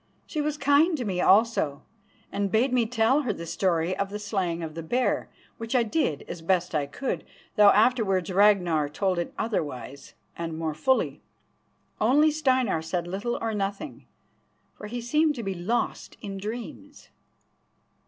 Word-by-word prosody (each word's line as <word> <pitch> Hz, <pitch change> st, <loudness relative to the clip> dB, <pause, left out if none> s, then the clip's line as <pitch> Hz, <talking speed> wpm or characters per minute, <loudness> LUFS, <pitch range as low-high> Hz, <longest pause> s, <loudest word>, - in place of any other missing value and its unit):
She 305 Hz, -, -3 dB
was 300 Hz, 0 st, -2 dB
kind 305 Hz, +4 st, +3 dB
to 250 Hz, -, -3 dB
me 185 Hz, -3 st, -1 dB
also, 195 Hz, -9 st, +3 dB, 0.5 s
and 200 Hz, -1 st, -1 dB
bade 245 Hz, +4 st, +2 dB
me 240 Hz, -3 st, +2 dB
tell 245 Hz, +5 st, +2 dB
her 255 Hz, -6 st, -1 dB
the 170 Hz, -4 st, -6 dB
story 170 Hz, 0 st, 0 dB
of 200 Hz, -, -2 dB
the 205 Hz, -, -5 dB
slaying 190 Hz, -5 st, -2 dB
of 160 Hz, -1 st, -5 dB
the 165 Hz, -, -6 dB
bear, 245 Hz, +10 st, 0 dB, 0.3 s
which 230 Hz, +3 st, -4 dB
I 245 Hz, -, +4 dB
did 220 Hz, -, -1 dB
as 170 Hz, -, -7 dB
best 175 Hz, +1 st, 0 dB
I 145 Hz, -2 st, 0 dB
could, 265 Hz, -, -3 dB, 0.3 s
though 210 Hz, -2 st, +7 dB
afterwards 200 Hz, -5 st, +2 dB
Ragnar 180 Hz, -7 st, +3 dB
told 185 Hz, +4 st, -1 dB
it 170 Hz, -, -3 dB
otherwise, 140 Hz, -, -4 dB, 0.2 s
and 165 Hz, -1 st, -5 dB
more 160 Hz, -1 st, -2 dB
fully. 260 Hz, -, 0 dB, 0.8 s
Only 290 Hz, +8 st, +4 dB
Steinar 260 Hz, -, +1 dB
said 170 Hz, +2 st, -3 dB
little 200 Hz, +7 st, -3 dB
or 225 Hz, -1 st, -2 dB
nothing, 200 Hz, -1 st, -4 dB, 0.7 s
for 210 Hz, -, -9 dB
he 240 Hz, +3 st, -5 dB
seemed 300 Hz, +5 st, +2 dB
to 235 Hz, -, -5 dB
be 195 Hz, -1 st, -2 dB
lost 190 Hz, +7 st, -2 dB
in 195 Hz, -1 st, -6 dB
dreams. 240 Hz, +7 st, -8 dB
205 Hz, 165 wpm, -26 LUFS, 175-245 Hz, 0.8 s, though